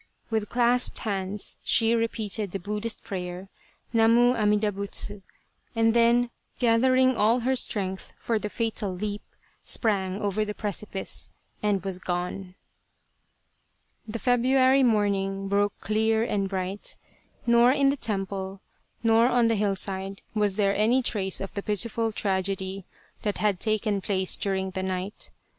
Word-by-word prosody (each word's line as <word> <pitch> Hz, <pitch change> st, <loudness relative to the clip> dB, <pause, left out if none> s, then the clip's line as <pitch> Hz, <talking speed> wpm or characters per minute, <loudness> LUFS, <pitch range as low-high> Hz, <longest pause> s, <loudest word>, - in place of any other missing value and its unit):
With 220 Hz, -2 st, -1 dB
clasped 245 Hz, +1 st, +2 dB
hands 200 Hz, -2 st, -3 dB
she 225 Hz, 0 st, +3 dB
repeated 220 Hz, -3 st, -1 dB
the 195 Hz, -, -2 dB
Buddhist 210 Hz, +4 st, -3 dB
prayer, 180 Hz, -1 st, -6 dB, 0.2 s
" -, -, -37 dB
Namu 230 Hz, +2 st, +5 dB
Amida 210 Hz, -2 st, +2 dB
Butsu" 200 Hz, 0 st, -1 dB, 0.5 s
and 225 Hz, 0 st, +3 dB
then, 235 Hz, +1 st, +4 dB, 0.3 s
gathering 255 Hz, +2 st, +4 dB
all 230 Hz, +3 st, +3 dB
her 260 Hz, +3 st, +1 dB
strength 190 Hz, -6 st, -2 dB
for 230 Hz, -2 st, -1 dB
the 210 Hz, -, -4 dB
fatal 225 Hz, -3 st, -2 dB
leap, 205 Hz, +2 st, -4 dB, 0.4 s
sprang 195 Hz, -4 st, 0 dB
over 205 Hz, 0 st, 0 dB
the 210 Hz, 0 st, -5 dB
precipice 205 Hz, -1 st, -3 dB, 0.3 s
and 205 Hz, -3 st, +1 dB
was 190 Hz, -2 st, -3 dB
gone. 180 Hz, +1 st, -4 dB, 1.5 s
The 220 Hz, +2 st, -4 dB
February 255 Hz, +3 st, +3 dB
morning 200 Hz, -4 st, +1 dB
broke 200 Hz, 0 st, 0 dB
clear 220 Hz, +1 st, +1 dB
and 200 Hz, -4 st, -1 dB
bright. 190 Hz, +1 st, -4 dB, 0.5 s
Nor 235 Hz, +1 st, +5 dB
in 275 Hz, 0 st, +3 dB
the 280 Hz, -, +1 dB
temple 195 Hz, -4 st, -4 dB, 0.4 s
nor 225 Hz, +1 st, +5 dB
on 245 Hz, -2 st, +3 dB
the 225 Hz, -, +2 dB
hillside 195 Hz, -1 st, -2 dB
was 210 Hz, -3 st, +1 dB
there 200 Hz, -1 st, +2 dB
any 230 Hz, +6 st, +3 dB
trace 190 Hz, -5 st, -1 dB
of 195 Hz, -, -6 dB
the 200 Hz, -, -3 dB
pitiful 225 Hz, +2 st, -1 dB
tragedy 195 Hz, -1 st, -1 dB, 0.4 s
that 205 Hz, -1 st, -1 dB
had 205 Hz, -4 st, +1 dB
taken 215 Hz, -2 st, 0 dB
place 190 Hz, -1 st, +1 dB
during 190 Hz, -1 st, -2 dB
the 190 Hz, -, -3 dB
night. 190 Hz, +1 st, -4 dB
210 Hz, 140 wpm, -26 LUFS, 195-230 Hz, 1.5 s, Namu